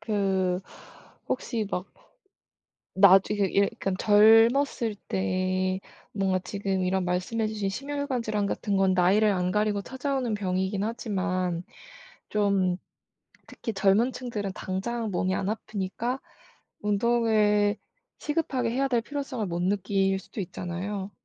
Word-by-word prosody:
그 190 -4 0 0.7
혹시 230 -4 -2
막 180 +2 -4 1.0
나중에 195 +1 +6 0.2
예 - - +5 0.2
그러니까 195 - -1
젊었을 225 +2 +5
때 185 - 0 0.3
뭔가 190 -2 +1
지금 195 0 -2
이런 185 0 0
말씀 180 +6 -1
해 220 - +2
주신 210 -2 -2
심혈관질환 250 -3 -2
같은 200 0 -1
건 190 -1 +3
나이를 195 +4 +4
안 180 -2 0
가리고 210 0 +1
찾아오는 260 0 -2
병이긴 190 0 -1
하지만 185 -6 -2 0.7
좀 200 -3 +1 0.7
특히 225 - -6
젊은 200 +5 +3
층들은 220 -6 -4
당장 220 +4 -3
몸이 185 +1 0
안 195 - -2
아프니까 220 +4 -3 0.6
운동을 210 -1 +2 0.4
시급하게 280 -6 -1
해야 270 +3 0
될 240 -3 +2
필요성을 275 -5 -4
못 175 -1 -2
느낄 195 0 +1
수도 200 - -8
있잖아요. 190 +2 -4
205 Hz, 260 characters per minute, -27 LUFS, 190-225 Hz, 1.0 s, 나중에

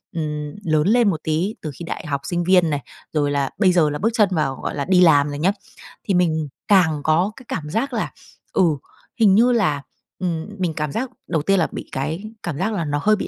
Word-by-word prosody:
ừm, 150 -2 -3
lớn 155 -1 +2
lên 230 -1 +4
một 160 - -1
tí, 165 +7 -1
từ 155 - -4
khi 170 - -8
đại 165 - -5
học 140 -1 -2
sinh 175 -1 -1
viên 180 -2 +4
này, 145 -2 0 0.3
rồi 145 -2 +1
là 140 -2 0
bây 190 -3 +4
giờ 160 -4 +4
là 150 - -3
bước 225 - +2
chân 215 -4 +3
vào, 150 -6 0
gọi - - -3
là, 140 -1 -2
đi 185 -1 +4
làm 145 -4 +6
rồi 145 0 -5
nhá, 185 +5 +3 0.5
thì 200 - -1
mình 160 -4 +1 0.2
càng 160 -7 +4
có 170 +6 +2
cái 260 - -14
cảm 150 -1 -4
giác 230 - -1
là, - - -2 0.4
ừ, 190 - +3 0.6
hình 205 -4 +6
như 240 +4 +5
là, 180 - +1 0.4
ừm, 170 -3 -2
mình 175 -3 0
cảm 150 -2 -3
giác 245 - -2 0.2
đầu 160 -3 0
tiên 195 +4 +2
là 165 - +2
bị - - -7
cái 150 +7 -3 0.2
cảm 170 -5 -3
giác 195 +7 -1
là 170 -6 -1
nó 145 0 -1
hơi 215 0 +5
bị - - -4
165 Hz, 240 wpm, -21 LUFS, 150-195 Hz, 0.6 s, làm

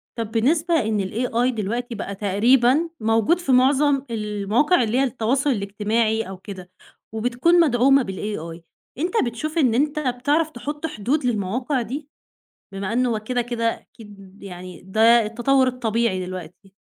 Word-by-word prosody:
طَب 225 -2 -4
بالنسبة 310 +9 +1
إن 215 -4 -1
الAI 240 +2 0
دلوقتي 235 +3 -3
بقى 200 - -5
تقريبًا 240 - +2
موجود 225 +9 +2
في 345 -6 -2
معظم 275 +2 +3
المواقع 215 - +1
اللي 225 +3 -1
هي - - +3
التواصل 265 +2 0
الاجتماعي 215 +1 0
أو 190 - -7
كده 185 -2 -10 0.4
وبتكون 245 +10 +2
مدعومة 270 -2 +4
بالAI. 185 -5 -6 0.4
أنت 345 +5 -2
بتشوف 300 +8 -4
إن 255 -7 +3
أنت 295 +3 +1
بتعرف 290 +4 0
تحط 295 +4 -6
حدود 265 +4 -2
للمواقع 245 +4 -1
دي؟ 280 +5 -6 0.7
بما 195 +1 -4
أن 250 +2 +1
هو 225 -3 0
كده 245 +3 -2
كده 235 -1 -4 0.2
أكيد 200 -3 -16
يعني 180 -2 -9
ده 225 +4 +4
التطور 260 +4 +2
الطبيعي 230 -6 -1
دلوقتي. 185 +2 -9
235 Hz, 140 wpm, -22 LUFS, 210-270 Hz, 0.7 s, مدعومة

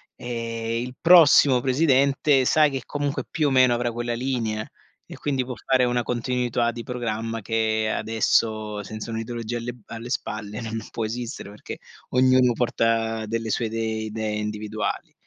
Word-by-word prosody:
ehm, 115 -1 -3
il 125 0 -9
prossimo 145 -7 +7
presidente, 135 0 +3
sa 155 +3 +5
che 135 -3 -4
comunque 145 +1 -2
più 155 -3 0
o - - +1
meno 130 -2 +5
avrà 120 0 -1
quella 120 +1 -3
linea, 115 -4 -2 0.4
e - - -10
quindi 135 -3 -1
può 125 - -5
fare 130 -1 +4
una 120 0 0
continuità 120 0 0
di 120 0 -7
programma, 115 -2 -3
che 110 0 0
adesso 110 -1 0
senza 110 +2 -7
un'ideologia 115 +1 -4
alle 120 +1 -5 0.3
b - - -5
spalle 105 -4 -4
non 115 0 -4
può 115 - -2
esistere, 115 -1 -5
perché 105 - -8 0.3
ognuno 130 -1 +4
porta 115 -2 0
delle 115 +1 -3
sue 115 - 0
idee 110 0 -2
idee 110 0 -3
individuali. 105 0 -4
115 Hz, 155 wpm, -24 LUFS, 110-125 Hz, 0.4 s, prossimo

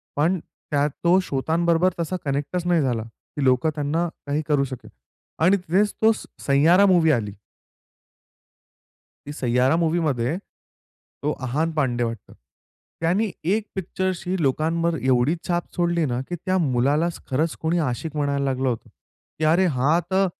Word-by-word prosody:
पण 170 +6 +2
त्यात 145 -2 -2
तो 175 +2 +5
श्रोत्यांबरोबर 170 +3 +1
तसा 170 +2 -2
कनेक्टच 145 +6 -2
नाही 175 -2 +3
झाला, 120 -5 0
की 115 +5 -8
लोकं 130 +4 +3
त्यांना 155 +3 0 0.2
काही 145 +2 0
करू 145 -3 +2
शकेल. 130 -3 -7 0.5
आणि 185 +5 +4
तिथेच 190 +3 +1
तो 225 0 +6
स 215 - -5 0.2
सैयारा 160 +8 +5
मूव्ही 175 -5 +4
आली. 105 -6 -1 1.9
ती 145 - -6
सैयारा 125 +1 +2
मूव्हीमध्ये 160 -4 0
तो 150 -6 -10
अहान 145 +6 -1
पांडे 130 -6 0
वाटतं. 115 -2 -5 0.7
त्यानी 190 +7 +1 0.2
एक 215 0 -1
पिक्चरशी 185 -1 -2
लोकांवर 165 +4 +1
एवढी 130 +4 +2
छाप 175 -1 0
सोडली 170 -2 +1
ना 125 -3 -1
की 175 - -2
त्या 185 +2 -1
मुलालाच 145 +6 +1
खरंच 155 +5 0
कोणी 160 +2 +1
आशिक 155 +2 -2
म्हणायला 140 -1 0
लागलं 130 -1 0
होतं. 115 -3 -4 0.5
की 155 - +1
अरे 170 +5 +4
हा 150 +7 +3
तर 195 +1 +3
155 Hz, 145 wpm, -23 LUFS, 135-175 Hz, 1.9 s, तो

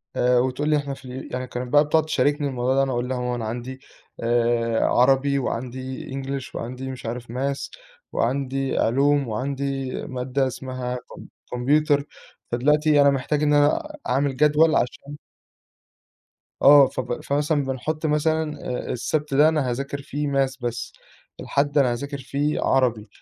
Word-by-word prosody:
آآ 125 0 +3
وتقول 130 +4 0
لي 150 - +4
إحنا 140 -1 -3
في 135 - -12
ال 130 +1 -8
يعني 125 0 -3
كانت 125 +2 -6
بقى 145 - +7
بتقعُد 160 +1 +3
تشاركني 145 0 +1
الموضوع 130 -1 0
ده، 135 - +4
أنا 135 - -1
اقول 125 0 -2
لها: 130 - -1
"يا - - -3
ماما 125 0 -1
أنا 115 -2 -4
عندي 120 +4 -5 0.4
آآ 115 -1 +1
عربي، 135 +2 +3
وعندي 130 +1 -4
English 135 0 -5
وعندي 130 +3 -5
مش 130 - -9
عارف 120 0 -5
math، 135 +2 -2 0.4
وعندي 135 +2 -1
علوم، 140 +3 +2
وعندي 135 +3 -3 0.2
مادة 130 +1 -1
اسمها 130 -1 -5
كم 125 - -10 0.2
كمبيوتر، 145 +3 +2 0.5
فدلوقتي 150 +4 +3
أنا 140 - +6
محتاج 140 +2 0
إن 150 - +3
أنا 225 - +2
أعمل 135 +1 +1
جدوَل 150 +2 +4
عشان" 145 +4 -2 1.5
آه 140 0 +8
فب 125 -1 -4
فمثلًا 145 +1 0
بنحط 150 +4 -3
مثلًا 150 0 0
آآ 125 - -3
آآ - - -1
السَبت 145 +3 -2
ده 150 +3 +6
أنا 150 -6 0
هاذاكر 140 +3 -4
فيه 145 +1 -3
math 135 -1 0
بس، 120 -1 -4 0.5
الحد 145 +1 0
أنا 130 -3 +3
هاذاكر 140 +3 -5
فيه 140 +3 -1
عربي، 120 -5 +1
135 Hz, 160 wpm, -23 LUFS, 125-145 Hz, 1.5 s, آه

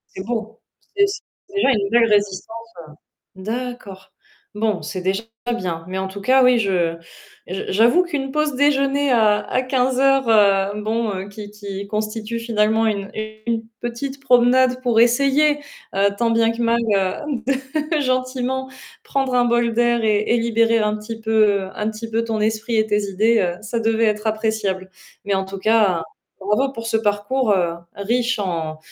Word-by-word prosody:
C'est 190 - -5
beau, 225 -1 -4 0.4
c'est 400 0 +5
c'est 400 -1 -10
déjà 395 -9 +3
une 205 -5 0
belle 230 +1 +4
résistance, 205 +2 -1 0.7
heu, - - -10
d'accord. 220 -4 -6 0.4
Bon, 210 -3 0
c'est 185 - -5
déjà 190 +4 -1 0.3
bien, 170 -4 -4
mais 185 +1 -4
en 190 0 -2
tout 195 +1 -8
cas, 260 +5 +4
oui, 250 -1 +5
je 180 -6 0 0.5
je 190 +1 -4
j'avoue 235 - +4
qu'une 285 -6 -4
pause 300 -1 0
déjeuner, 280 0 +2
heu, - - +5
à 215 +2 +2
15:00 260 0 +2
heu, 200 -1 +3
bon, 225 +1 -1
heu, 190 +1 -5
qui 205 0 -9
qui 200 -1 -7
constitue, 215 +2 -3
finalement, 225 -1 +1
une 200 -2 -1 0.4
une 230 -1 0 0.2
petite 265 +4 -5
promenade 250 0 +4
pour 235 -3 +2
essayer, 275 +5 +3 0.4
heu, 200 +1 +3
tant 235 +1 +1
bien 230 0 +3
que 230 +1 -5
mal, 235 0 +2 0.2
heu, 240 +8 -2 0.5
de - - +2
gentiment 255 0 -1 0.3
prendre 270 -2 -1
un 245 -1 +3
bol 235 -1 +1
d'air 240 0 +2
et 215 -2 +3
et - - +3
libérer 230 0 +2
un 210 -1 +1
petit 225 +2 -7
peu 215 -3 +2
un 210 +1 -2
petit 220 +1 -7
peu 225 +1 0
ton 225 -1 -2
esprit 220 +2 -1
et 215 - +3
tes 210 -1 +1
idées, 215 +4 +2
heu, 175 -3 0
ça 225 +2 -3
devait 225 0 +1
être 210 0 0
appréciable. 215 -4 -1 0.4
Mais 200 - 0
en 190 0 0
tout 195 +1 -7
cas, 200 -5 +2 0.4
bravo 210 +8 0
pour 230 -3 -7
ce 225 - +1
parcours, 215 +3 0
heu, 180 -4 +2 0.2
riche 235 +5 0
en 165 -6 -3
225 Hz, 170 wpm, -20 LUFS, 205-245 Hz, 0.7 s, c'est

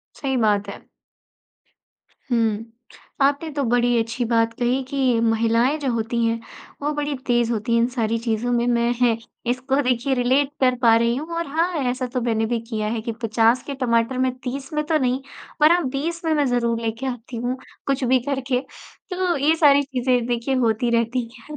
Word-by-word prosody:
सही 265 -3 -2
बात 205 -3 +1
है। - - -10 1.4
हुँ, 225 -2 +1 0.6
आपने 285 +3 +2
तो 285 -1 -2
बड़ी 245 0 +2
अच्छी 230 +2 -2
बात 230 0 +1
कही 245 +2 +1
कि 260 -4 +1
महिलाएँ 230 +5 +2
जो 280 -3 -1
होती 230 +1 -1
हैं 230 0 0 0.4
वो 295 +1 0
बड़ी 295 -1 -2
तेज़ 240 -1 +2
होती 230 +1 -1
हैं 230 - +4
इन 235 - +3
सारी 230 -3 -1
चीज़ों 230 +1 -1
में। 240 0 +1
मैं 235 0 +2
है 235 -2 +3 0.3
इसको 260 +3 0
देखिए 250 +1 0
रिलेट 260 +3 +2
कर 255 -1 +4
पा 230 -2 +6
रही 235 +1 +1
हूँ 315 +5 -5
और 335 - -2
हाँ 330 +5 0 0.2
ऐसा 255 +1 -2
तो 250 - 0
मैंने 225 -2 0
भी 235 0 -1
किया 215 -2 -2
है 220 - -3
कि 230 +1 -3
50 225 +2 +3
के 280 - -3
टमाटर 235 -1 +1
में 260 0 +1
30 270 +2 -5
में 300 0 0
तो 315 0 +2
नहीं 255 -1 0 0.4
पर 305 +2 +6
हाँ 350 -1 +3
20 330 +6 -3
में 320 - +2
मैं 295 -2 +2
ज़रूर 235 -2 0
लेके 225 +3 -3
आती 245 -2 -5
हूँ 245 +2 -2 0.3
कुछ 275 -1 0
भी 255 +1 +3
करके 265 -2 0 0.5
तो 365 -2 0
ये 300 +4 +3
सारी 285 -3 +5
चीज़ें 250 -3 0
देखिए 245 +2 -1
होती 235 -1 +1
रहती 235 +2 0 0.2
है। 300 +6 -10
245 Hz, 195 wpm, -22 LUFS, 230-275 Hz, 1.4 s, पा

